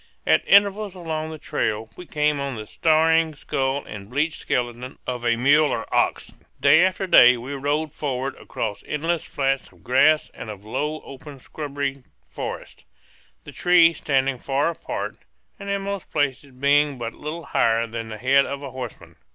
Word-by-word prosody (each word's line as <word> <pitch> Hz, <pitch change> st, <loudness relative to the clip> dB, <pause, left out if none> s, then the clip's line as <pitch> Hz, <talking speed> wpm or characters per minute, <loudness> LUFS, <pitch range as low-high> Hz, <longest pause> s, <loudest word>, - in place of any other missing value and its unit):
At -, -, +4 dB
intervals 200 Hz, 0 st, +4 dB
along 160 Hz, -3 st, -4 dB
the 160 Hz, -, -7 dB
trail 110 Hz, -8 st, -2 dB
we 180 Hz, -, -11 dB
came 150 Hz, -1 st, +1 dB
on 140 Hz, -2 st, -3 dB
the 110 Hz, -1 st, -6 dB
staring 160 Hz, +3 st, +2 dB
skull 135 Hz, -1 st, -2 dB
and 100 Hz, -1 st, -9 dB
bleached 150 Hz, +5 st, -1 dB
skeleton 120 Hz, +1 st, -3 dB
of 125 Hz, -1 st, -4 dB
a 120 Hz, -1 st, +2 dB
mule 145 Hz, +6 st, +4 dB
or 115 Hz, -, -2 dB
ox. -, -, +1 dB, 0.3 s
Day 160 Hz, +3 st, +6 dB
after 190 Hz, +1 st, 0 dB
day 125 Hz, -8 st, +7 dB
we 125 Hz, +4 st, -6 dB
rode 145 Hz, +2 st, -1 dB
forward 135 Hz, -2 st, -3 dB
across 105 Hz, -3 st, -5 dB
endless 165 Hz, +2 st, -1 dB
flats 135 Hz, -1 st, -2 dB
of -, -, -23 dB
grass 150 Hz, +5 st, +3 dB
and 110 Hz, -, -8 dB
of 100 Hz, -2 st, -8 dB
low 150 Hz, +7 st, -3 dB
open 140 Hz, +1 st, -11 dB
scrubby 140 Hz, 0 st, -5 dB, 0.3 s
forest, -, -, -7 dB, 0.6 s
the -, -, -10 dB
trees 170 Hz, -2 st, +4 dB
standing 135 Hz, -2 st, 0 dB
far 140 Hz, +5 st, 0 dB
apart 170 Hz, -, -5 dB, 0.4 s
and 200 Hz, 0 st, -7 dB
in 200 Hz, 0 st, -1 dB
most 200 Hz, -2 st, -5 dB
places 145 Hz, -1 st, -1 dB
being 140 Hz, +2 st, +2 dB
but 115 Hz, -1 st, -5 dB
little 155 Hz, +3 st, -6 dB
higher 115 Hz, 0 st, +2 dB
than 115 Hz, 0 st, -6 dB
the 110 Hz, -1 st, -7 dB
head 135 Hz, +4 st, +4 dB
of 140 Hz, 0 st, -5 dB
a 135 Hz, -, -6 dB
horseman. 125 Hz, -3 st, -8 dB
140 Hz, 170 wpm, -23 LUFS, 125-155 Hz, 0.6 s, day